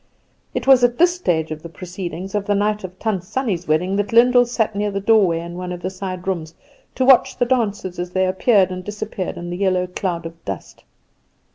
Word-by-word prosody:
It - - -2
was 265 -2 +6
at 245 0 +3
this 350 +1 +5
stage 165 - -1
of 155 0 -5
the 170 - -9
proceedings 180 +2 -7
on 205 -1 -1
the 205 - +1
night 210 +1 0
of 185 0 -8
Tant 205 -5 -2
Sannie's 190 -4 -2
wedding 180 +6 +1
that 205 0 -1
Lyndall 245 +1 +5
sat 225 -3 -1
near 205 +1 0
the 200 0 -2
doorway 200 -5 +3
in 170 0 -8
one 180 0 -5
of 175 -1 -7
the 185 - -2
side 185 -1 -6
rooms, 165 -4 -3 0.4
to 260 - +1
watch 260 -2 +5
the 245 - +2
dancers 210 -7 -1
as 175 0 -3
they 185 +1 +1
appeared 190 0 +3
and 185 0 -5
disappeared 210 -2 -5
in 175 0 -6
the 175 - -4
yellow 185 -2 +1
cloud 180 -2 -3
of 165 0 -9
dust. 95 -4 -7
190 Hz, 220 wpm, -20 LUFS, 175-215 Hz, 0.4 s, was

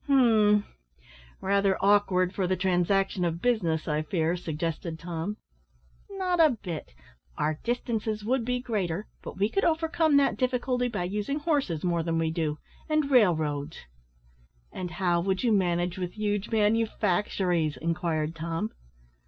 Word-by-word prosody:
"Hum, 220 -6 +4 0.8
rather 195 0 +2
awkward 195 -2 +3
for 190 -2 -1
the 185 - +1
transaction 185 +1 +1
of 170 -1 -1
business, 175 -9 0
I 150 -1 0
fear," 160 +1 0
suggested 165 0 -4
Tom. 170 +4 -4 0.7
"Not 370 -3 -1
a 305 -7 +5
bit; 160 - -6 0.4
our 150 +1 -1
distances 225 -3 -2
would 250 +1 +1
be 250 +1 -1
greater, 205 -6 -2 0.2
but - - -8
we 200 +2 +2
could 395 - -1
overcome 320 -2 +2
that 280 - +3
difficulty 250 -1 0
by 210 -7 -3
using 210 +9 -2
horses 290 - -1
more 170 -2 +1
than 165 0 -1
we 165 -1 0
do 155 -2 -1 0.3
and 305 -2 +1
railroads." 160 - +2 0.9
"And 180 -1 -5
how 175 0 0
would 190 +3 -1
you 240 - +3
manage 175 -2 +1
with 180 -1 -3
huge 205 -1 -2
manufactories?" 205 -6 +1
inquired 165 -1 -1
Tom. 165 +6 -3
190 Hz, 140 wpm, -27 LUFS, 170-230 Hz, 0.9 s, a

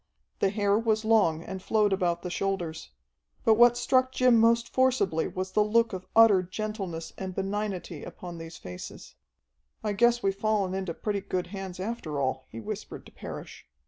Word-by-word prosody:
The 195 - +3
hair 205 0 +2
was 220 -1 0
long 200 -8 +3
and 190 +1 -6
flowed 210 0 +2
about 175 -3 0
the 180 - -4
shoulders. 180 -5 -3 0.6
But 225 - +6
what 240 +2 +6
struck 255 +1 +2
Jim 250 -3 +4
most 230 +1 +4
forcibly 255 -11 +2
was 185 0 -4
the 210 +2 +3
look 230 +1 +2
of 185 0 -6
utter 225 -4 +7
gentleness 185 -3 -5
and 190 -1 -5
benignity 195 -5 -3
upon 175 -2 -8
these 165 0 -9
faces. 90 0 -9 0.7
"I 210 - 0
guess 240 +3 +3
we've 195 - +2
fallen 205 -2 0
into 190 -3 -3
pretty 205 -2 -2
good 185 -2 -2
hands 190 -2 -6
after 185 -8 -4
all," 130 -1 -2
he 115 - -8
whispered 110 - -7
to - - -14
Parrish. - - -9
195 Hz, 175 wpm, -28 LUFS, 180-220 Hz, 0.7 s, utter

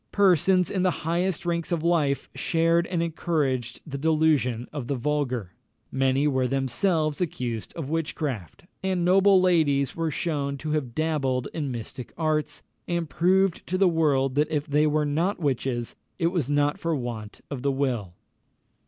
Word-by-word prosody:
Persons 185 -2 +3
in 190 - 0
the 180 -4 0
highest 175 +1 0
ranks 170 -1 -1
of 165 -2 0
life 150 -6 +1
shared 165 0 +1
and 170 -2 -1
encouraged 145 -7 -1
the 140 -3 -5
delusion 150 -6 +2
of 140 -5 -5
the 140 - -1
vulgar. 130 -7 -1 0.4
Many 135 +2 +2
were 130 -3 +1
themselves 145 +5 0
accused 120 -9 -3
of 155 -4 -5
witchcraft; 145 - -3 0.2
and 185 -2 0
noble 195 +1 +5
ladies 155 -7 +2
were 165 -1 -1
shewn 140 -3 -2
to 155 +2 -4
have 135 -6 -2
dabbled 140 -6 0
in 150 -4 -2
mystic 120 +1 -7
arts, 155 -2 -1 0.2
and 170 -1 -1
proved 185 +4 +2
to 185 - -1
the 195 0 +4
world 145 -6 +2
that 150 +2 +1
if 150 -2 -1
they 150 +1 +2
were 150 0 +1
not 165 +8 0
witches, 130 -5 -2 0.2
it 170 -1 +1
was 165 -8 -1
not 145 0 +1
for 165 -1 0
want 115 -5 -6
of 135 -3 -4
the 140 +1 +1
will. 125 -10 -2
150 Hz, 160 wpm, -26 LUFS, 135-170 Hz, 0.4 s, noble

